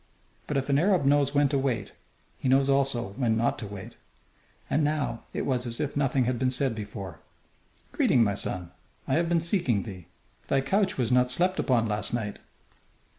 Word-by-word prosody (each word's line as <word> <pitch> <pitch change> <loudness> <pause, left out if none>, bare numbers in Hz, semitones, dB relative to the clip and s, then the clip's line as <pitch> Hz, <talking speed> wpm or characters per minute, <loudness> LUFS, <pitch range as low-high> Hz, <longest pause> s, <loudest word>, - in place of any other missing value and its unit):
But 150 - -1
if 135 - -1
an 140 0 +3
Arab 180 -3 +2
knows 140 0 +3
when 145 0 +4
to 140 -1 +1
wait, 120 -7 -1 0.5
he 130 - -1
knows 135 +1 +4
also 135 -4 +1
when 115 -4 +1
not 120 +1 0
to 105 - -6
wait. 100 +3 -9 0.7
And 150 - +1
now 145 -6 -1
it - - -3
was 125 -2 -1
as 115 0 -4
if 145 -2 -2
nothing 135 -2 +2
had 120 0 -1
been 130 - +2
said 130 0 0
before. 100 -5 -7 0.7
"Greeting, 120 - +3
my 100 -2 +1
son. 90 -3 -3 0.4
I 135 - 0
have 170 +2 +2
been 170 -1 +2
seeking 165 - 0
thee. 95 -6 -9 0.4
Thy 135 - +2
couch 195 +6 +1
was 125 -3 0
not 125 0 +4
slept 180 +8 +2
upon 120 -3 +2
last 105 +2 0
night." 105 -3 -4
130 Hz, 190 wpm, -27 LUFS, 115-145 Hz, 0.7 s, when